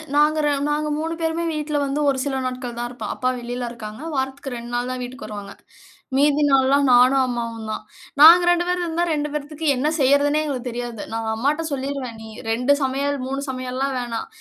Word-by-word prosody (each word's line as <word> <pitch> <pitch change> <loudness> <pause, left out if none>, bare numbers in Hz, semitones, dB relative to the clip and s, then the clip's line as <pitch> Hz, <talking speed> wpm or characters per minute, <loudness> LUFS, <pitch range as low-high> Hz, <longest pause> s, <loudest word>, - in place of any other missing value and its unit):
நாங்க 300 +1 +4
ர - - +3 0.2
நாங்க 300 +1 0
3 325 +1 -2
பேருமே 325 +1 -1
வீட்ல 300 -1 -2
வந்து 275 +2 -2
ஒரு 270 - +1
சில 270 -2 -1
நாட்கள் 250 -1 -4
தான் 240 0 -2
இருப்போம், 240 -4 -6
அப்பா 255 - 0
வெளில 245 0 -4
இருக்காங்க. 215 0 -8
வாரத்துக்கு 265 -1 -3
2 235 +1 -8
நாள் 245 +1 -1
தான் 255 0 -4
வீட்டுக்கு 245 -2 -8
வருவாங்க, 205 -2 -7 0.6
மீதி 295 +1 +3
நாள்லாம் 275 +1 +4
நானும் 255 +2 +6
அம்மாவும் 230 -2 -4
தான், 215 - -4 0.4
நாங்க 340 +3 +10
2 350 0 +2
பேர் 360 0 0
இருந்தா, 340 +1 0
2 295 -1 -2
பேத்துக்கு 300 +2 -4
என்ன 280 +4 0
செய்றதுன்னே 285 +3 +3
எங்களுக்கு 255 -4 -3
தெரியாது, 240 -2 -5
நான் 225 0 -2
அம்மாட்ட 290 +7 0
சொல்லீருவேன், 265 -4 -4
நீ 220 - -9 0.2
2 250 +5 +3
சமையல், 280 +2 0
3 270 +1 -3
சமையல்லாம் 255 +1 -2
வேணாம், 235 -2 -4
265 Hz, 185 wpm, -22 LUFS, 245-295 Hz, 0.6 s, நாங்க